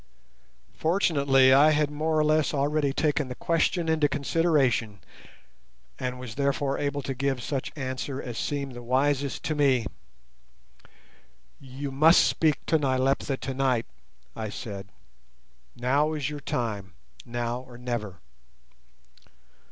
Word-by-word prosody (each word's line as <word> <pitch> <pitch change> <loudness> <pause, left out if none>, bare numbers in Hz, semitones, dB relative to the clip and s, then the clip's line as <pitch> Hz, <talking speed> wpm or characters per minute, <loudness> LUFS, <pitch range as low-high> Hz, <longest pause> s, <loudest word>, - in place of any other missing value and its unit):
Fortunately, 140 -7 +4
I 145 +3 +7
had 150 -1 +2
more 155 +2 -1
or 155 - +4
less 155 -1 +2
already 145 0 +1
taken 150 0 0
the 125 - -6
question 170 +2 0
into 155 -2 +2
consideration, 140 - +1 1.0
and 125 0 -3
was 125 -4 -7
therefore 140 +1 0
able 145 -1 -2
to 135 - -3
give 135 -1 -2
such 135 0 -3
answer 130 -1 -4
as 120 -3 -6
seemed 140 +2 -3
the 120 - -8
wisest 135 +3 0
to 155 - -1
me. 135 -5 +2 1.7
"You 135 +1 -7
must 155 +6 +6
speak 155 -2 +1
to 160 - +2
Nyleptha 135 0 0
tonight," 130 -3 0 0.5
I 110 -1 -4
said. 100 -3 -7 0.9
"Now 140 +5 +1
is 150 -1 -2
your 150 - -5
time, 105 -9 -3 0.3
now 120 0 -3
or 125 -1 -13
never. 120 -7 -4
135 Hz, 125 wpm, -27 LUFS, 125-150 Hz, 1.7 s, I